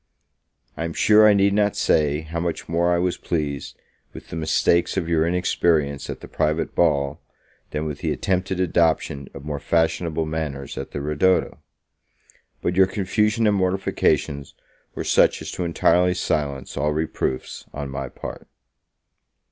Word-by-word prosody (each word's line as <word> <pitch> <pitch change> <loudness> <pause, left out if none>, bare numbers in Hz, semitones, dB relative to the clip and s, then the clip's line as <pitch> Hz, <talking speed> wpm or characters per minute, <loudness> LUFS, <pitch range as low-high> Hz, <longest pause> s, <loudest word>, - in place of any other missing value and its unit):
I 80 - -4
am 85 - -4
sure 110 +4 +6
I 105 - +6
need 100 0 +3
not 105 0 +2
say, 75 -1 +2
how 80 +1 -5
much 85 -1 -3
more 85 +1 +1
I 85 - +3
was 90 0 0
pleased 75 -5 -3 0.4
with - - -11
the - - -6
mistakes 80 +3 +1
of 85 -4 -1
your 80 -1 +2
inexperience 85 -5 +1
at - - -6
the - - -9
private 75 +1 -1
ball, 75 -2 +1 0.5
than 75 +1 -3
with 75 -2 -4
the - - -1
attempted 95 0 -1
adoption 80 -6 +1
of 70 +1 -9
more 75 -1 -3
fashionable 80 +1 0
manners 75 -3 -4
at - - -5
the 70 - -5
ridotto. 75 +6 +1 1.0
But 85 - 0
your 95 0 +5
confusion 105 +3 0
and 105 -1 +3
mortifications 80 -6 0 0.4
were - - -3
such - - +3
as - - -6
to 90 - -3
entirely 90 +2 +3
silence 70 -5 -2
all 75 +1 +1
reproofs 75 -4 -3
on 70 -1 -6
my 70 -1 -4
part. - - -8
80 Hz, 155 wpm, -23 LUFS, 75-90 Hz, 1.0 s, sure